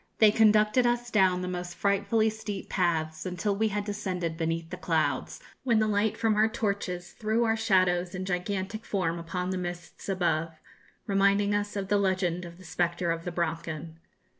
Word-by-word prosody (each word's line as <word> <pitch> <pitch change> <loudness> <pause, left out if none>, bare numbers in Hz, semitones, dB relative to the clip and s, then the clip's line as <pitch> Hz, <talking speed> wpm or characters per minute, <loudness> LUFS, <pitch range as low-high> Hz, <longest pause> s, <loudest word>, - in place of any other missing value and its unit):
They 215 -2 +7
conducted 215 +2 +4
us 240 0 -1
down 185 -3 +3
the - - -3
most 180 -1 -4
frightfully 205 +2 +2
steep 210 -2 -6
paths 160 -3 0
until 185 +3 -1
we 220 +2 +2
had 205 -1 -2
descended 185 -5 -3
beneath 165 0 -2
the 180 - -4
clouds, 155 -6 -1 0.2
when 235 -4 +3
the 215 - +3
light 210 +1 +1
from 225 -1 +2
our 215 +1 +4
torches 200 -6 -3
threw 220 +2 0
our 225 -1 +2
shadows 185 -5 +2
in 185 0 -4
gigantic 190 +3 -2
form 170 -4 -1
upon 180 +2 -3
the 185 - -2
mists 175 +1 -6
above, 165 -4 0 0.5
reminding 200 +1 +3
us 205 0 -1
of 195 -1 -3
the 205 0 +3
legend 185 -2 0
of 170 0 -10
the 185 - -14
'Spectre 170 +1 0
of 165 0 -3
the 175 - -2
Brocken.' 165 -1 -3
185 Hz, 180 wpm, -28 LUFS, 175-210 Hz, 0.5 s, They